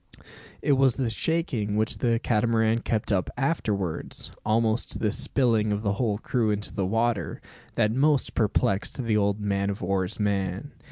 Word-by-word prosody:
It 145 - +2
was 135 -3 +4
the 125 -4 -1
shaking 120 -7 -1
which 110 +1 0
the 115 -2 +2
Catamaran 115 0 +1
kept 110 -2 -1
up 95 -2 +1
afterwards, 105 - -2
almost 110 +1 +1
to - - -4
the 105 - 0
spilling 115 -3 +2
of 105 +1 -1
the 100 -2 +1
whole 105 -1 0
crew 115 0 0
into 105 0 -2
the 95 -2 -1
water, 115 +2 0 0.4
that 110 -1 +2
most 140 +2 +2
perplexed 110 +2 0
the 115 -2 +1
old 100 0 +1
man 100 -1 0
o' 100 - -2
war's 95 +1 -1
man. 100 +4 -1
110 Hz, 165 wpm, -26 LUFS, 100-120 Hz, 0.4 s, was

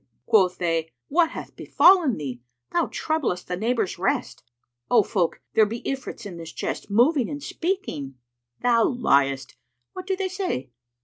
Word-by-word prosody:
Quoth 185 -4 +3
they, 165 -2 -1 0.2
"What 330 +1 +3
hath - - -8
befallen 350 - +4
thee? 130 -5 -5 0.3
Thou 345 -1 +1
troublest 295 - -2
the 180 - -2
neighbours' 225 0 -1
rest." - - -1 0.5
"O 235 -4 +5
folk, 185 -5 -1
there 220 - +5
be 230 +3 -6
Ifrits 265 -4 -5
in 185 -4 -7
the 165 - -8
chest, - - -5
moving 245 +5 +3
and 290 -1 -6
speaking." 165 - -3 0.5
"Thou 235 -2 +4
liest: 140 - +1 0.4
what 370 0 -8
do 385 - +1
they 380 0 -2
say?" 360 - -3
230 Hz, 150 wpm, -24 LUFS, -, 0.5 s, O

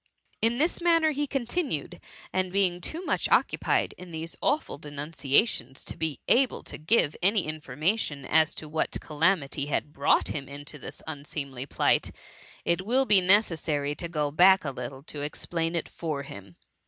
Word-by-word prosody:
'' - - -40
In 230 +2 +2
this 320 +5 +1
manner 330 -2 +4
he 290 0 -2
continued; 270 - -2 0.3
and 185 -1 0
being 185 -2 +2
too 335 - -4
much - - 0
occupied - - +2
in 180 0 -10
these 165 +1 -6
awful 290 - 0
denunciations, 145 - -1
to - - -4
be 160 -3 -2
able 260 0 +3
to - - -7
give 155 -2 +3
any 195 +1 +3
information 155 - -2
as 160 +2 +3
to 155 - -6
what 155 +1 -1
cala 165 +5 +2
mity 140 -1 -4
had 150 0 -2
brought 140 - +2
him 140 -2 -5
into 145 +1 -5
this - - -10
unseemly 140 -3 -6
plight, - - +2 0.6
it 170 +2 +1
will 255 +6 +2
be 205 -6 +6
necessary 165 -7 +2
to 170 +3 -5
go 150 -3 -1
back 185 +4 +5
a 140 - -1
little 130 +1 -7
to 150 -1 -6
explain 165 +3 -2
it 170 - -1
for 155 -4 -4
him. 100 -8 -11
160 Hz, 170 wpm, -27 LUFS, 145-195 Hz, 0.6 s, be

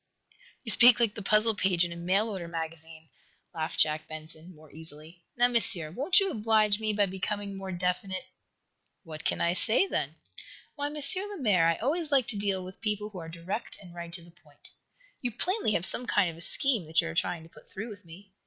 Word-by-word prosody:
"You 225 - +7
speak 235 +4 +8
like 230 -3 +1
the 215 - -7
puzzle 215 +3 +3
page 185 -4 +1
in 170 - -6
a - - -6
mail 185 +5 0
order 190 -5 -5
magazine," 160 -1 -7 0.4
laughed 160 0 -4
Jack 155 0 +3
Benson, 155 +2 -7
more 155 -1 -18
easily. 160 +2 -10 0.2
"Now, 245 +1 +5
Monsieur, 190 -10 +4
won't 285 - +3
you 390 -1 0
oblige 215 -2 +2
me 215 -1 -1
by 205 -1 +2
becoming 200 +1 -4
more 195 -1 -6
definite?" 180 +1 -3 0.8
"What 155 -3 -9
can - - -1
I 170 0 +2
say, 220 - +3
then?" - - -3 0.6
"Why, 285 -1 -3
M. 295 - -7 0.3
Lemaire, 210 - +2
I 165 - +2
always 305 - -2
like 270 -4 +3
to 220 - -3
deal 195 -2 -1
with 185 +1 -12
people 210 -1 -2
who 190 - -8
are 165 -1 -8
direct 170 +7 -6
and 180 -3 -14
right 170 -1 -8
to 170 - -2
the 170 - -17
point. 155 -4 -20 0.5
You 245 - -1
plainly 350 - -1
have 175 - +2
some 250 +5 -1
kind 195 -7 +2
of 165 - -14
a - - 0
scheme 230 - +5
that 160 +1 +2
you 165 - +1
are - - -6
trying 170 0 -2
to 165 - -16
put - - -18
through 220 +5 -6
with 205 -1 -11
me. 185 +4 -15
190 Hz, 215 wpm, -28 LUFS, 165-220 Hz, 0.8 s, speak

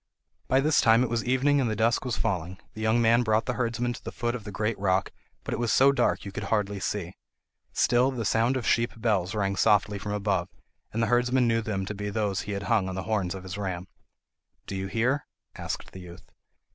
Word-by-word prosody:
By 130 +1 +3
this 155 +2 +3
time 115 +2 +5
it 120 - -2
was 115 -1 0
evening 135 +3 +2
and 120 - 0
the 110 - -1
dusk 115 +4 +1
was 120 -3 -2
falling. 95 -4 -2 0.2
The 110 - -8
young 110 +2 +2
man 115 +1 +5
brought 110 -1 +1
the 125 - -1
herdsman 120 0 -1
to - - -11
the - - -6
foot 120 0 -2
of 115 -4 -6
the 105 - -6
great 105 +3 -2
rock, 95 -1 +1 0.3
but - - -4
it - - -2
was 120 -2 0
so 135 +1 +6
dark 125 -6 0
you 100 - -6
could 100 +1 -5
hardly 100 -1 0
see. 95 -2 -3 0.6
Still 125 +2 +3
the 125 -4 -3
sound 115 +5 +2
of 125 - -4
sheep 115 0 +1
bells 105 -4 0
rang 100 -2 0
softly 105 +1 +2
from 105 +1 -4
above, 100 -3 -1 0.4
and 115 +1 -1
the - - +1
herdsman 125 +2 +2
knew 115 0 +2
them 100 -4 -3
to 105 - -4
be 105 0 -4
those 100 -2 -1
he 105 - -5
had 100 0 -3
hung 100 -2 +1
on 95 - -5
the 95 - -3
horns 95 -2 -1
of 95 - -8
his 95 +1 -6
ram. 95 -2 -4 0.8
"Do 100 - -5
you 95 0 -3
hear?" 125 +8 0 0.3
asked - - -5
the 95 - -10
youth. 90 -1 -13
110 Hz, 235 wpm, -27 LUFS, 100-120 Hz, 0.8 s, so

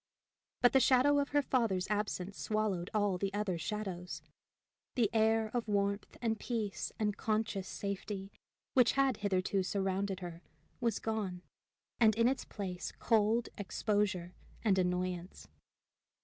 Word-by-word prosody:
But 245 - +6
the 265 - +7
shadow 270 +3 +5
of 280 - 0
her 290 0 +2
father's 220 -9 +1
absence 200 -2 -1
swallowed 210 -5 -1
all 205 -4 +1
the 195 0 -1
other 200 -5 -1
shadows. 185 -2 -4 0.7
The 225 -5 +2
air 220 0 +3
of 240 -2 -1
warmth 200 0 -1
and 225 -1 +1
peace 220 -5 -2
and 210 -2 0
conscious 215 -3 -1
safety 200 0 -4 0.4
which 250 -2 +5
had 275 -2 +2
hitherto 195 -1 +1
surrounded 195 0 -1
her 170 -1 -7 0.4
was 230 -4 +1
gone, 200 -5 -3 0.6
and 220 -3 +5
in 230 +1 +4
its 265 +1 0
place 185 -3 -5
cold, 225 +1 +2
exposure, 200 -3 0 0.3
and 195 -4 +3
annoyance. 180 0 -2
205 Hz, 135 wpm, -34 LUFS, 190-225 Hz, 0.7 s, the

